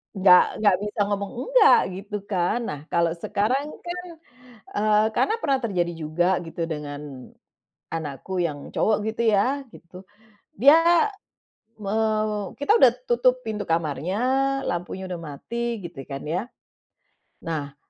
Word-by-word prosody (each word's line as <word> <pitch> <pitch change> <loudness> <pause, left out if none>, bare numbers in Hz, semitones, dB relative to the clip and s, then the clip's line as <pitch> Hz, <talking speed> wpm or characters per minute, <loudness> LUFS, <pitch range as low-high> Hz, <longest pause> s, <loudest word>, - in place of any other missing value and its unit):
Nggak 185 0 +5
nggak 205 -3 +4
bisa 210 0 -5
ngomong 200 -1 -2 0.2
nggak, 475 -1 +7 0.2
gitu 200 +2 -7
kan. 185 +4 0
Nah, 150 - -4
kalau 170 -1 +2
sekarang 215 - -1 0.2
kan, 355 +1 -4 0.7
eee, 215 +1 +3
karena 435 - +2
pernah 275 -7 +1
terjadi 175 -6 0
juga, 165 +4 0 0.2
gitu, 165 0 -4
dengan 145 -4 -7 0.6
anakku 165 +4 -4
yang 145 -4 -4
cowok, 215 -1 +2 0.2
gitu 230 - -3
ya, 255 +8 +2
gitu. 180 -3 -14 0.6
Dia, 330 - +6 0.7
me 200 0 -3 0.7
kita 285 +8 +2
udah 255 - +7 0.2
tutup 250 +1 +3
pintu 215 -2 -3
kamarnya, 165 +2 -1 0.5
lampunya 175 +2 -4
udah 180 - -4
mati, 225 +9 -5
gitu 165 -6 -7
kan, 135 -1 -6
ya, 165 +4 -1 1.0
nah, 145 -4 -4
190 Hz, 125 wpm, -24 LUFS, 165-235 Hz, 1.0 s, nggak